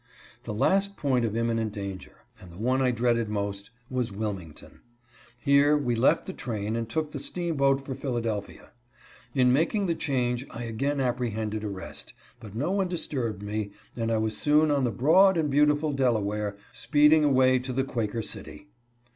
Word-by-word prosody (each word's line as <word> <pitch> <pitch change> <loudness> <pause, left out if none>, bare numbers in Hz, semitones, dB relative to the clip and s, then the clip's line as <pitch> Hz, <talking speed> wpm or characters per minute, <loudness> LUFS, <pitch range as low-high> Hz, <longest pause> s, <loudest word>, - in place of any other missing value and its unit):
The - - -4
last 195 - +2
point 130 -4 +1
of 110 0 -2
imminent 115 -2 0
danger, 100 -3 -6 0.3
and 90 - -13
the 85 - -13
one 130 +5 +1
I 130 - +3
dreaded 120 -2 +1
most, 100 -1 -3 0.2
was 125 -3 -2
Wilmington. 95 -6 -6 0.6
Here 140 +3 +4
we 125 -5 0
left 115 +3 +3
the 190 - -6
train 110 - -3
and 115 -1 -3
took 155 +3 -2
the 145 - -5
steamboat 140 -5 0
for 135 - -4
Philadelphia. 115 -6 -4 0.6
In 125 -2 +4
making 170 +8 +1
the 170 - +1
change 125 -5 -1
I 120 - -7
again 135 +5 -2
apprehended 110 -4 -2
arrest, 100 -3 -6 0.3
but 110 -3 -11
no 145 +10 -1
one 195 -1 +1
dis 175 -2 -1
turbed 115 -8 -3
me, 105 0 -3 0.2
and 115 -1 -1
I 115 - +2
was 110 0 -1
soon 150 +1 +3
on 140 -3 +2
the - - +1
broad 170 - +5
and 150 -3 0
beautiful 150 +1 +3
Delaware, 105 -6 0 0.2
speeding 150 +1 +4
away 130 -2 +4
to 125 +1 -5
the 135 +1 0
Quaker 115 -4 -2
City. 150 - -8
125 Hz, 170 wpm, -27 LUFS, 110-145 Hz, 0.6 s, broad